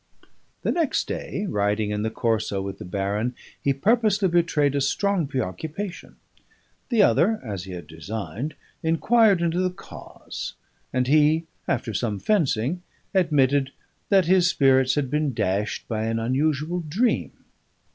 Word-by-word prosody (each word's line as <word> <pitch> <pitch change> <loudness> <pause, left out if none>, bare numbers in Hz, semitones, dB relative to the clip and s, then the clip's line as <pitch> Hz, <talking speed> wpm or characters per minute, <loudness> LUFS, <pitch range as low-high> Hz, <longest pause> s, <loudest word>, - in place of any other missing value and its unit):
The - - +1
next 330 -5 0
day, 200 - -4
riding 105 - 0
in 105 0 -1
the 110 - 0
Corso 110 -3 -1
with 95 0 -5
the - - -7
baron, 100 +6 -2 0.3
he 140 - +2
purposely 210 - +2
betrayed 165 -5 +2
a 140 - 0
strong 185 +4 +1
preoccupation. 155 - -5 0.7
The 230 -5 +4
other 215 +5 +3
(as 100 -6 -5
he 95 - -8
had 85 -3 -7
designed) 100 - -5 0.3
inquired 195 +4 +3
into 170 +1 +1
the 185 0 +2
cause; 180 - -9 0.4
and 125 0 +1
he, 155 +4 +4 0.2
after 120 -4 -1
some 105 0 -1
fencing, 155 - +1 0.3
admitted 145 -7 +2 0.4
that 195 -3 +5
his 180 0 +4
spirits 130 -4 +4
had 135 -3 -1
been 150 -4 0
dashed 100 +2 -1
by 110 -1 -2
an 115 0 -1
unusual 150 +8 0
dream. 180 +10 0
140 Hz, 140 wpm, -24 LUFS, 110-175 Hz, 0.7 s, that